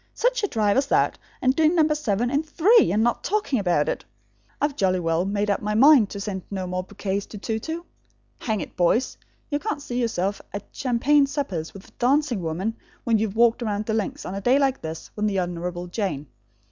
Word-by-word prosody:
Such - - +1
a 410 - +1
drive 215 - +1
as 275 0 +2
that, - - +2 0.2
and 255 +1 +3
doing 320 +2 +3
number 310 -2 +4
seven 245 -5 -1
in 285 +1 +2
three 365 +9 +4
and 215 +2 +2
not 240 0 0
talking 405 - 0
about 175 -6 +1
it! - - -2 0.6
I've 290 -1 0
jolly 185 -6 +1
well 165 +1 0
made 205 +1 0
up 200 - -1
my 210 0 -1
mind 260 -3 +6
to 200 - -6
send 200 -2 -4
no 190 -2 -3
more 180 0 -2
bouquets 200 +1 -4
to 210 - -9
Tou 220 +2 -3
Tou. 325 +8 -5 0.5
Hang 215 -4 -1
it, - - -8
boys! 180 +8 +2 0.4
You 290 - +1
can't 295 0 -3
see 250 -3 -3
yourself 200 -4 -1
at 200 - -4
champagne 275 +3 +2
suppers 195 - -3
with 195 - -11
a - - -20
dancing 260 -3 +2
woman, 180 +7 -3 0.3
when 230 -2 +2
you've 215 -1 -2
walked 235 +1 +4
round 210 -2 -2
the 220 - -1
links, 215 -3 -2
on 185 - -5
a 195 - -4
day 250 +6 +4
like 270 -2 +1
this, 160 0 -7
with 210 0 0
the 195 -2 0
Honourable 175 0 -3
Jane. 180 -6 -3
220 Hz, 215 wpm, -24 LUFS, 190-275 Hz, 0.6 s, mind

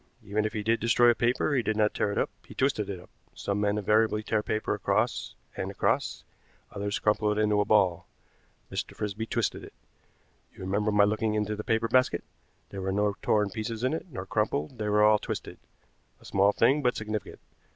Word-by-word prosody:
Even 105 +1 -1
if 110 - -2
he 105 - -3
did 115 +2 +2
destroy 120 +1 +5
a - - +2
paper 125 +5 +1
he 130 - +3
did 110 -1 -1
not 105 -1 +2
tear 100 - 0
it - - -4
up, - - 0 0.2
he - - -12
twisted 130 -7 0
it 95 -3 -4
up. 90 - -16 0.2
Some 100 0 -2
men 105 0 +1
invariably 105 +1 +2
tear 110 0 0
paper 110 +1 -1
across 105 +3 -1 0.2
and - - -3
across, - - -1 0.5
others 100 0 -2
crumple 105 0 +1
it 105 - -1
into 105 -1 +3
a - - 0
ball. 100 -5 +2 0.6
Mr. - - -4
Frisby 105 +2 -4
twisted - - -1
it. - - -11 0.8
You - - -12
remember 100 +3 0
my 105 0 +5
looking 110 +1 +1
into 105 0 -1
the 105 - -6
paper 115 +1 +1
basket. 130 +2 +2 0.5
There 100 - -5
were 95 0 -1
no 100 +1 +1
torn 105 -2 +2
pieces 110 +2 -4
in 130 - +1
it, 160 - -4
nor 130 - -6
crumpled; 105 - -1
they 105 -1 -1
were 105 0 +4
all 105 0 +5
twisted. - - -6 0.6
A - - -19
small 100 +1 +3
thing, 140 +7 +3
but 125 -2 +1
significant. 105 -1 -4
105 Hz, 205 wpm, -28 LUFS, 105-110 Hz, 0.8 s, destroy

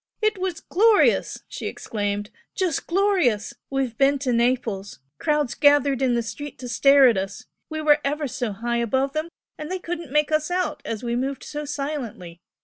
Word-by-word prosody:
"It 430 -2 +1
was 365 -3 -3
glorious!" 430 +3 +3
she - - -6
exclaimed 205 -1 -3 0.2
"Just 365 -7 -1
glorious! 345 - +2 0.2
We've 270 -4 -1
been 280 +1 +4
to 250 - +1
Naples, 235 -5 0 0.2
crowds 300 -4 +1
gathered 285 -2 +4
in 255 -2 +2
the 235 - 0
street 290 +6 -7
to 255 - -7
stare 275 +2 +6
at 230 -5 +3
us, 195 +6 -6 0.2
we 315 -1 -4
were 300 -1 +5
ever 290 +1 -1
so 250 -3 -3
high 235 +4 -2
above 265 +4 0
them 310 +2 -2 0.3
and 305 0 -6
they 375 - -1
couldn't 340 -5 -6
make 300 +1 +2
us 310 +1 +1
out, 360 +1 -1
as 225 0 -4
we 235 0 -1
moved 265 +2 -2
so 295 0 -5
silently! 275 - -5
275 Hz, 180 wpm, -24 LUFS, 235-310 Hz, 0.3 s, stare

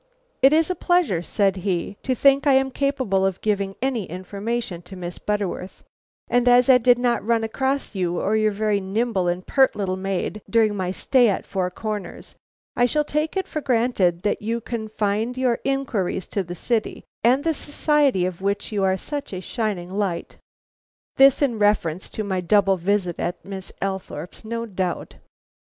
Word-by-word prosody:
"It 270 - +7
is 320 +3 +3
a - - -1
pleasure," 350 - +1
said 195 +2 +1
he, 185 +1 -2
"to 255 - -1
think 275 +3 +4
I 280 - +6
am 265 0 +3
capable 260 -9 0
of 190 -1 0
giving 200 -2 -1
any 250 -7 0
information 200 +2 -4
to 180 +2 -11
Miss 175 -1 -6
Butterworth, 200 -3 -3 0.4
and 245 0 +2
as 245 +1 +6
I 250 - +6
did 245 0 +5
not 245 -1 0
run 230 0 +1
across 265 +4 -1
you 180 -3 -1
or 210 - 0
your 215 0 +2
very 210 0 0
nimble 195 -1 -1
and 175 +1 -2
pert 270 -1 +3
little 195 -3 -1
maid 195 +2 -3
during 220 -2 +3
my 185 -2 -2
stay 245 +5 +3
at 195 - -2
Four 185 -2 -2
Corners, 210 +2 -6 0.4
I 245 - +3
shall 300 +4 +1
take 300 +4 -2
it 380 - -1
for 305 - -4
granted 225 -9 +1
that 205 - 0
you 230 +2 -1
confined 220 0 -2
your 255 -2 +1
inquiries 240 -10 -1
to 200 - -1
the 175 -1 -6
city 225 +4 -1 0.2
and 255 +5 +4
the 325 - +1
society 290 - +2
of 185 0 -4
which 200 +3 -1
you 205 -2 0
are 190 0 +2
such 290 +6 -5
a 185 - -3
shining 190 -3 -3
light." 190 -4 -3 0.8
This 275 +1 +6
in 240 -6 0
reference 195 -5 +1
to 215 - -4
my 190 -3 -2
double 195 +1 +3
visit 185 -1 -1
at 175 - -3
Miss 195 -1 -6
Althorpe's, 190 -1 -5
no 230 +1 -4
doubt. 185 -4 -4
210 Hz, 180 wpm, -23 LUFS, 190-250 Hz, 0.8 s, It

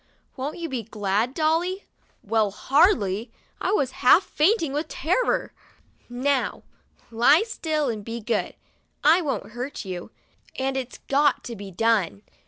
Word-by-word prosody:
Won't 275 +3 -4
you 340 -1 -4
be 260 -5 -3
glad, 215 +3 -1
Dolly?" 335 +5 0 0.4
Well, 220 -2 +1
hardly! 230 - +2 0.3
I - - 0
was 280 -11 +1
half 320 +9 +7
fainting 325 -3 +1
with 300 +2 -2
terror. 370 +13 0 0.6
'Now, 260 +3 -1 0.5
lie 245 - +5
still 315 -9 -2
and 220 -4 -3
be 230 +2 -5
good! 230 +1 -2 0.5
I 320 +5 +6
won't 285 -8 -3
hurt 245 +1 -6
you, 180 0 -6 0.5
and 265 0 -1
it's 260 -2 -4
got 285 +1 +2
to 235 - -6
be 200 -1 -8
done." 205 -1 +1
265 Hz, 140 wpm, -24 LUFS, 225-310 Hz, 0.6 s, half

